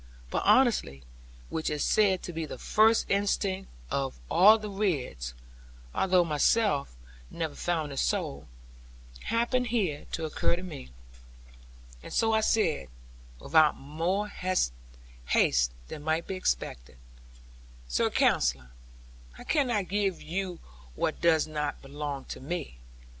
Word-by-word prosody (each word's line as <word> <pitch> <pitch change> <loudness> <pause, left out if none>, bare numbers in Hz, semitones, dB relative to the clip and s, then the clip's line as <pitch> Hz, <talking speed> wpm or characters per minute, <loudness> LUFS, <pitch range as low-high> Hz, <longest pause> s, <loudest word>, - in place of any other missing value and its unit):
But - - 0
honesty, 225 - +3 0.5
which 160 - -2
is 150 -1 -1
said 200 -4 +3
to 175 - -6
be 160 -1 -3
the - - -7
first 220 +1 +3
instinct 195 -1 0 0.2
of 135 -1 -2
all 210 +5 +7
the 215 -1 -6
Ridds 145 - -2 0.6
(though 185 -2 +3
I - - -6
myself 150 - +2 0.3
never 160 -3 -4
found 160 -3 -2
it 135 - -7
so), 70 - -1 0.8
happened 240 +2 +1
here 195 -11 -1
to 165 - -2
occur 155 +2 +1
to 180 - -7
me, 155 - -8 1.1
and - - -10
so 225 -1 +2
I 220 - +3
said, 190 - +1 0.5
without 155 - +4
more 165 +9 -2
haste 185 - -1 1.1
than 145 - -7
might 160 +2 0
be - - -4
expected, - - -3 0.9
'Sir - - +1
Counsellor, 60 0 +1 0.7
I - - -10
cannot 240 - +1
give 195 -2 0
you 180 +1 -4 0.4
what - - -2
does 165 -2 +4
not 150 -2 -3
belong 140 0 -5
to - - -6
me. 145 - -5
170 Hz, 130 wpm, -28 LUFS, 145-200 Hz, 1.1 s, all